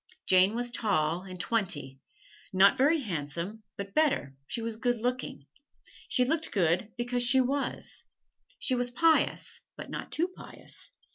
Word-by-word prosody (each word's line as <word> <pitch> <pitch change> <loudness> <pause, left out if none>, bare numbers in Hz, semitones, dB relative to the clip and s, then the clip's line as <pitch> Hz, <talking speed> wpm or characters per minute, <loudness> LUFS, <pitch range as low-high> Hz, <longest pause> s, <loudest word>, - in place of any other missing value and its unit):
Jane 190 +2 +5
was 240 0 -2
tall, 175 -8 +1
and 185 -1 -8
twenty 180 - -1 0.5
not 195 +4 +6
very 290 +4 +3
handsome, 170 - -4 0.2
but 200 0 -6
better, 280 - +2
she - - -3
was 230 -1 -3
good 245 +1 0
looking. 245 - -3 0.6
She 250 - +2
looked 320 +4 0
good 185 +2 +1
because 245 +1 -1
she 245 +2 +5
was. 275 +2 -1 0.5
She 260 - 0
was 245 0 +1
pious, 320 +5 +2 0.2
but - - -8
not - - -5
too 345 +3 +1
pious. - - -8
230 Hz, 145 wpm, -30 LUFS, 185-255 Hz, 0.6 s, not